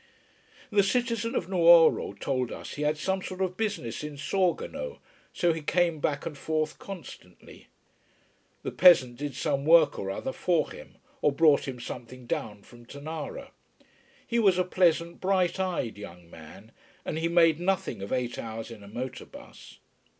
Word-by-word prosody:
The 205 -1 +5
citizen 230 +2 0
of - - -1
Nuoro 170 - +5
told 130 -3 -1
us - - -7
he 145 - -6
had 150 +1 +1
some 190 +5 -1
sort 185 0 -7
of 185 -1 -1
business 200 - -3
in 150 -1 -6
Sorgono, 190 - -1 0.3
so 175 -1 +1
he 160 - -5
came 170 +1 +1
back 145 0 -1
and 155 - -5
forth 155 +1 -2
constantly. 170 - -11 1.0
The - - -3
peasant 130 -10 +6
did 145 -2 -5
some 140 +1 -1
work 160 -1 +5
or 95 - -4
other 100 +7 -3
for 170 -4 0
him - - -12 0.3
or 150 - +3
brought 150 -1 +4
him 130 -2 -5
something 125 +1 -8
down 105 -3 -4
from 120 -1 -16
Tonara. 160 - -7 0.7
He 235 - 0
was 195 -5 +4
a 185 - +3
pleasant, 170 -2 +1
bright 185 -1 +1
eyed 175 - -2
young 90 -4 -11
man, 80 +7 -13 0.3
and 160 - -3
he 165 - 0
made 165 -2 +4
nothing 185 - -1
of 100 - -6
eight 125 -2 -2
hours 115 0 -6
in 110 -3 -10
a 100 - -12
motor 120 +5 -6
bus. - - -14
155 Hz, 165 wpm, -28 LUFS, 125-180 Hz, 1.0 s, peasant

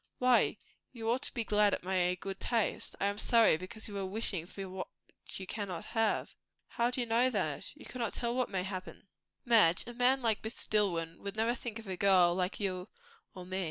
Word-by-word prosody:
"Why? 250 -1 +4 0.4
You 225 -3 -6
ought 250 +2 +1
to - - -4
be 235 - 0
glad 210 -1 +3
at - - -10
my 180 -1 +1
good 195 0 -6
taste." 230 -3 -1
"I - - +1
am 200 +1 -1
sorry, 230 -7 +5
because 185 +6 -7
you 205 - -8
are 195 - -2
wishing 190 -4 -2
for 195 0 -7
what 185 0 -5 0.5
you 190 - -5
cannot 190 -4 -4
have." 225 -2 0 0.4
"How 235 +1 +1
do 250 +1 -2
you - - -1
know 235 +3 +3
that? 180 - -2
You 300 - -13
cannot 240 -3 -3
tell 235 -1 -1
what 255 0 0
may 185 -2 -1
happen." 185 0 -7 0.4
"Madge, 215 -8 +5
a 240 - -7
man 250 +2 +3
like 220 -2 +1
Mr. 220 +1 -5
Dillwyn 170 -6 0
would 200 0 -6
never 225 +2 +2
think 235 -2 -6
of 225 - -9
a 185 -1 -4
girl 185 -3 +5
like 180 +2 -1
you 185 -1 -2 0.5
or 180 -1 -8
me." 185 +1 -3
205 Hz, 215 wpm, -32 LUFS, 185-235 Hz, 0.5 s, sorry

